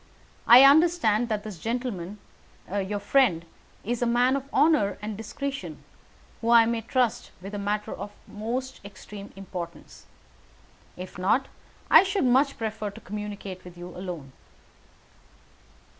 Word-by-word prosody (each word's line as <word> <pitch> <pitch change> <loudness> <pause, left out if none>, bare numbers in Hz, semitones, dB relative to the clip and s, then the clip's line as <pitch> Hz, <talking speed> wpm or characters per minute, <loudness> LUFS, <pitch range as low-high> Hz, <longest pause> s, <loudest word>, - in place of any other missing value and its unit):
I 245 +3 +10
understand 275 -7 +4
that 210 -2 -2
this 210 -6 -8
gentleman, 220 -4 -4 0.6
your 205 0 -1
friend, 200 -5 +2 0.4
is 240 +2 -2
a 240 - +2
man 245 +3 +3
of 275 0 -5
honour 280 -9 +3
and 210 +1 -5
discretion, 275 +6 -6 0.6
whom 230 - -1
I 235 -1 +7
may 230 0 -1
trust 245 0 0
with 195 +3 -9
a 205 - -3
matter 205 +1 -2
of 205 +2 -7 0.2
the - - -17
most 245 +5 -4
extreme 200 0 -10
importance. 180 -3 -9 0.9
If 180 0 -8
not 220 +9 +1 0.4
I - - +10
should 390 -4 0
much 270 +3 +3
prefer 220 -2 -3
to 200 - -12
communicate 205 -2 -7
with 180 -1 -12
you 175 +1 -8
alone." 175 -7 -7
215 Hz, 140 wpm, -26 LUFS, 195-250 Hz, 0.9 s, I